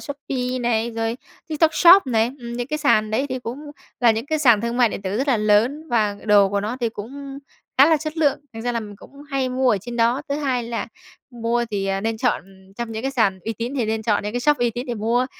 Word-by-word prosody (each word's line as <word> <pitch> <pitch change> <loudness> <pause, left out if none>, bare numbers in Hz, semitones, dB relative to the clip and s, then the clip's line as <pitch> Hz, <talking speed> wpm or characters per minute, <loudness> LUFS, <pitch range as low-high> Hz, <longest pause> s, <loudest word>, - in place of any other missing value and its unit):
Shopee 260 -3 -4
này, 235 -1 0
rồi 225 0 -2 0.3
TikTok 315 0 +2
Shop 355 -2 +7
này, 230 0 +1
ừm, 235 0 -7
những 240 0 -3
cái 305 +3 -3
sàn 215 -8 +2
đấy 260 +6 0
thì 260 -1 -3
cũng 265 +5 -7 0.3
là 240 -2 +6
những 225 +3 -2
cái 310 +1 0
sàn 240 -8 +5
thương 235 +1 -2
mại 245 -2 +4
điện 200 - -6
tử 195 +1 -2
rất 270 +5 -1
là 260 - +4
lớn 225 +9 +2
và 215 -5 +1
đồ 205 -2 +5
của 200 +1 -1
nó 215 +5 -3
thì 235 - +1
cũng 270 +6 -8 0.4
khá 275 - +8
là 320 0 +4
chất 310 +1 -6
lượng, 290 -4 +2
thành 225 0 -7
ra 245 - -1
là 230 - -1
mình 205 -2 -9
cũng 280 +7 -15
hay 270 -2 0
mua 255 0 +1
ở 210 - +2
trên 235 +4 -7
đó. 235 +4 +2
Thứ 280 - -1
hai 260 -5 -1
là 230 0 -4 0.4
mua 240 0 -1
thì, 200 -2 -2
à, 195 0 -1
nên 225 +1 -2
chọn 245 -6 0 0.3
trong 235 -1 -4
những 220 0 -5
cái 270 - -1
sàn 220 -8 +1
uy 225 - -2
tín 235 +4 -5
thì 245 - +1
nên 220 0 -2
chọn 210 -2 +1
những 210 0 -4
cái 245 - -2
shop 295 +3 +3
uy 240 -1 +1
tín 245 +4 -6
để 240 - -3
mua, 235 +4 0
240 Hz, 265 wpm, -22 LUFS, 220-270 Hz, 0.4 s, khá